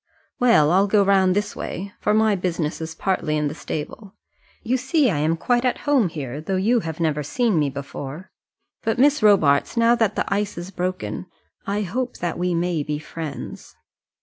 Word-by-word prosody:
"Well, 230 -12 +5
I'll 195 +3 +4
go 205 0 +4
round 190 -2 +3
this 205 0 -1
way, 195 +3 -5
for - - +1
my 220 -1 +4
business 170 -4 -2
is 160 0 -5
partly 170 -5 -1
in 150 -1 0
the - - -5
stable. 190 +7 -6 0.5
You 240 +3 +1
see 265 0 +2
I 145 - -1
am 160 +2 +1
quite 240 +7 +1
at 250 - 0
home 275 -10 +3
here, 145 -2 -6
though 190 +5 -2
you 220 +6 +2 0.2
never 155 -3 +1
have - - -7
seen 230 -6 +1
me 145 -2 +1
before. 140 +4 -7 0.5
But, 225 0 -1
Miss 285 +2 +4
Robarts, 195 -4 +4
now 230 0 +5
that 225 -3 +1
the - - 0
ice 205 -1 -2
is 175 +2 -6
broken, 185 0 -4 0.4
I 205 +1 0
hope 245 +7 -3
that 175 -1 -3
we 180 -1 0
may 170 -2 0
be 150 0 -3
friends." 155 -1 -7
185 Hz, 190 wpm, -22 LUFS, 160-220 Hz, 0.5 s, Well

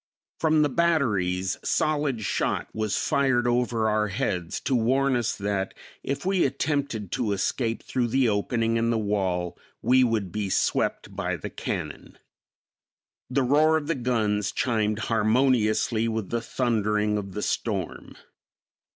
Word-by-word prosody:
From 155 -1 +3
the 145 - +2
batteries 105 - +1
solid 145 -6 0
shot - - -1
was 110 -2 -1
fired 130 -3 +2
over 120 -2 +1
our 105 0 +1
heads 90 -3 -2
to 135 - -1
warn 130 +3 +2
us 120 -2 0
that 100 -1 -2 0.3
if 140 +5 -4
we 190 -1 +2
attempted 140 - -1
to 105 - 0
escape 115 +4 -1
through 125 -2 -1
the 130 +2 +2
opening 115 +2 0
in 115 0 +1
the 115 - +1
wall 95 -5 -1 0.2
we 130 +2 +4
would 110 -6 0
be 105 0 -2
swept - - 0
by - - -1
the - - -7
cannon. - - -5 1.1
The 130 +1 +1
roar 155 +5 +4
of 155 - -4
the 165 - 0
guns 110 - 0
chimed 110 -3 0
harmoniously 115 0 +2
with 110 -4 -3
the 115 0 0
thundering 105 -3 0
of 100 -2 -7
the 105 - -3
storm. 100 -6 -3
115 Hz, 140 wpm, -26 LUFS, 105-130 Hz, 1.1 s, we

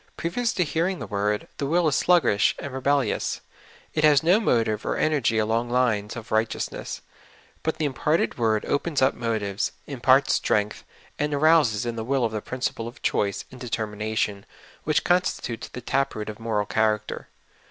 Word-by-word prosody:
Previous 225 +9 -1
to 180 - +1
hearing 170 +4 -1
the - - -6
word, 105 +1 -1
the 140 - -2
w^ll 170 +2 +2
is 145 - +2
sluggish 170 - +3
and 140 - -6
rebel 140 +1 +2
lious; 110 - -2 0.5
it 155 - 0
has 150 -2 +5
no 180 +6 +5
motive 115 - +1
or - - -1
energy 140 -7 +1
along 115 +2 +1
lines 120 -4 +1
of 115 -2 -9
right 110 +1 +2
eousness; - - -5 0.6
but 160 - -2
the 155 - 0
imparted 150 +4 0
word 110 -2 +1
opens 145 -1 0
up 130 - +4
motives, 110 -4 -2
imparts 135 0 +3
strength, 105 0 0 0.4
and 150 0 0
arouses 145 -7 +4
in 120 -1 -3
the 110 - -2
will 130 0 +1
the 110 -1 -4
principle 125 -2 -3
of 120 +4 -11
choice 100 -1 0
and 130 - -12
determination, 110 -3 -2 0.4
w^hich 155 -2 +2
constitutes 175 -9 0
the 125 - -8
tap 135 +3 0
root 105 0 -4
of 105 - -8
moral 110 -2 -1
character. 110 0 -1
120 Hz, 175 wpm, -25 LUFS, 110-150 Hz, 0.6 s, has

